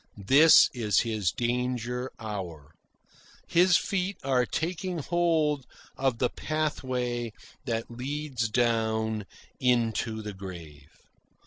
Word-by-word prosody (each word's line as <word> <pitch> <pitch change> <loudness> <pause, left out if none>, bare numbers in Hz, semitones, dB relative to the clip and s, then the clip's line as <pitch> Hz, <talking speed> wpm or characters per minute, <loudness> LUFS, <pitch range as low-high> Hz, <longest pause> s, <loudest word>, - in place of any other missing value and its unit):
This 150 +8 +8
is 110 -5 +2
his 110 -6 0
danger 125 +1 -2
hour. 95 -9 -6 0.7
His 180 +1 +5
feet 195 0 -2
are 130 -2 +2
taking 180 +2 -2
hold 160 -4 +1 0.3
of 135 -3 0
the 125 - +2
pathway 125 -6 -2 0.3
that 115 -2 -3
leads 130 -1 -3
down 110 -2 0 0.3
into 115 -3 +1
the 105 -1 -5
grave. 85 -7 -10
125 Hz, 100 wpm, -28 LUFS, 110-145 Hz, 0.7 s, This